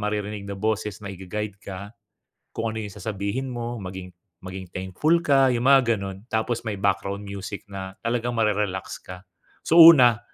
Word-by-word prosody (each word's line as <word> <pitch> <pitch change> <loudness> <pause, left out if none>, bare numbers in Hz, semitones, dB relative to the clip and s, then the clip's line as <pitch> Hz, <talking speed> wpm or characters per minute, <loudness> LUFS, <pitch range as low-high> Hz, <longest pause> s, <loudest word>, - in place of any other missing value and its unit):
maririnig 105 -1 -3
na 100 - -5
boses 105 0 -2
na 100 - -5
i-ga-guide 100 +2 -6
ka. 100 +2 -8 0.6
Kung 115 0 -2
ano 110 - -5
'yong 105 -3 -6
sasabihin 105 +6 -3
mo, 120 -2 -5
maging 90 -1 -8 0.3
maging 95 0 -7
thankful 95 - +1
ka 135 -3 +5
'yong 120 -1 0
mga 130 -4 +5
gano'n. 95 -1 -6
Tapos 110 +1 -1
may 105 - -3
background 100 +1 -1
music 100 +1 -7
na 95 -1 -8
talagang 120 +1 -1
mare-relax 105 -4 -1
ka. 90 0 -11 0.4
So 165 +2 +6
una 130 -10 +9
105 Hz, 165 wpm, -24 LUFS, 95-115 Hz, 0.6 s, una